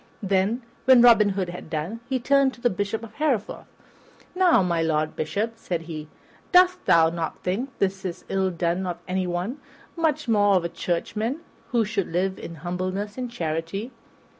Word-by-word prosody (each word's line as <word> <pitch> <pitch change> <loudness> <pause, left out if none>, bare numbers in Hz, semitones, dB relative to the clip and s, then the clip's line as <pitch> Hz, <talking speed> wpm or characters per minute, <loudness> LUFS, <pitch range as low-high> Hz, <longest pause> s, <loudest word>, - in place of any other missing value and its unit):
Then, 200 +5 +1 0.2
when 255 -2 +7
Robin 225 -4 +7
Hood 190 -2 -2
had 175 -2 -8
done, 165 +8 -3
he 265 - +1
turned 275 +1 +3
to 240 - -19
the 245 - +2
Bishop 205 +4 -2
of 225 -1 -10
Hereford. 280 -9 -1 0.7
"Now, 360 - +4
my 170 -2 0
Lord 155 -1 0
Bishop," 215 +8 -2
said 175 -6 -3
he, 155 -2 -7 0.4
"dost 365 0 +5
thou 165 -1 +5
not 165 -1 -4
think 215 +10 -1
this 195 -1 -1
is 185 -1 -5
ill 190 -1 +1
done 175 +1 -1
of 175 -1 -3
anyone, 185 +7 -2 0.4
much 310 -4 0
more 205 -3 +4
of 180 -2 +2
a - - -1
churchman, 215 - -2 0.3
who 235 -3 +2
should 205 -3 -1
live 190 +2 0
in 170 - -7
humbleness 185 +4 -3
and 250 -1 -4
charity?" 165 +3 -3
195 Hz, 170 wpm, -25 LUFS, 175-240 Hz, 0.7 s, when